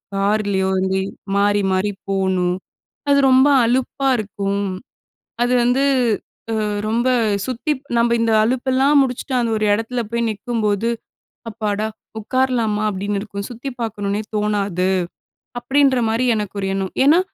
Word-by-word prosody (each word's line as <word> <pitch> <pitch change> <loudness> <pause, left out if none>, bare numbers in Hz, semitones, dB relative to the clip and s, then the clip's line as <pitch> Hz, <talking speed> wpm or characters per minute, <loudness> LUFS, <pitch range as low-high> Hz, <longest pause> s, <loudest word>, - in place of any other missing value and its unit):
கார்லயோ 200 -1 +1
வந்து 190 0 0 0.4
மாறி 205 0 +3
மாறி 190 +2 +1 0.2
போணும். 190 -2 +1 0.5
அது 280 0 +5
ரொம்ப 260 +2 +6 0.2
அலுப்பா 260 +3 0
இருக்கும். 200 -1 -2 0.8
அது 245 +1 +1
வந்து 250 +3 +2 0.8
அ - - 0 0.2
ரொம்ப 235 +3 +1 0.4
சுத்தி 260 +4 -2 0.3
நம்ம 235 0 +3
இந்த 230 0 +2
அலுப்பெல்லாம் 260 +4 +2
முடிச்சுட்டு 260 0 -2
அந்த 235 -2 0
ஒரு 215 - 0
எடத்துல 225 +3 -1
போய் 235 0 0
நிக்கும்போது 215 0 -1 0.6
"அப்பாடா 215 -1 -2 0.3
உட்காரலாமா?" 235 -2 0
அப்டின்னு 200 +1 -2
இருக்கும். 200 -1 -6
சுத்தி 245 +3 -6
பார்க்கணும்ன்னே 205 -2 -2
தோணாது, 200 -3 0 0.7
அப்டின்ற 270 +1 +3
மாரி 230 +3 +1
எனக்கு 210 -2 -4
ஒரு 195 - -1
எண்ணம். 195 -1 -2
ஏன்னா 310 +5 +6
215 Hz, 125 wpm, -20 LUFS, 200-245 Hz, 0.8 s, ரொம்ப